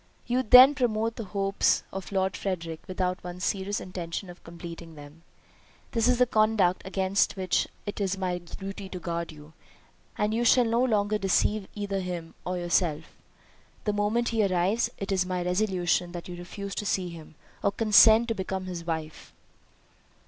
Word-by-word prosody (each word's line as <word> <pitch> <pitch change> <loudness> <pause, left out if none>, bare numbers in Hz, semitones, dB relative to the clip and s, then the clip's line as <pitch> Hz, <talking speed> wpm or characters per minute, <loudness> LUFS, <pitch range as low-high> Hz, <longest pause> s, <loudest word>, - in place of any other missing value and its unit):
"You 250 +1 +1
then 255 +4 +9
promote 230 -4 0
the 225 - -6
hopes 195 0 +1
of 190 0 -6
Lord 190 -1 0
Frederick 170 -4 -4
without 185 0 -2
one 180 0 -7
serious 195 +2 -1
intention 180 0 -6
of 175 - -16
completing 170 -1 -9
them? 145 +2 -13 0.7
This 230 0 +2
is 250 -1 +3
a 250 - +6
conduct 215 -5 +2
against 190 +1 +1
which 185 -2 +1 0.2
it 205 0 -5
is 195 -1 0
my 180 -2 -2
duty 195 +3 -8
to 185 - -6
guard 170 0 -4
you, 150 0 -14 0.6
and 210 +1 0
you 235 +2 +1
shall 240 +1 +5
no 230 +2 +2
longer 210 -3 +1
deceive 195 +1 +1
either 200 -2 -2
him 175 -3 -5
or 180 0 -1
yourself. 175 -3 -1 0.7
The 210 - 0
moment 210 +3 +1
he 225 -2 +1
arrives, 195 +4 +1
it 195 +1 -4
is 190 -1 +2
my 180 -1 -2
resolution 180 -2 0
that 175 -1 -7
you 180 - -7
refuse 195 +3 -7
to 210 - -4
see 185 -3 0
him, 160 -2 -11 0.3
or 200 - +2
consent 220 +2 +6
to - - +1
become 190 -2 -4
his 175 -2 -5
wife." 160 -2 -5
190 Hz, 170 wpm, -27 LUFS, 175-210 Hz, 0.7 s, then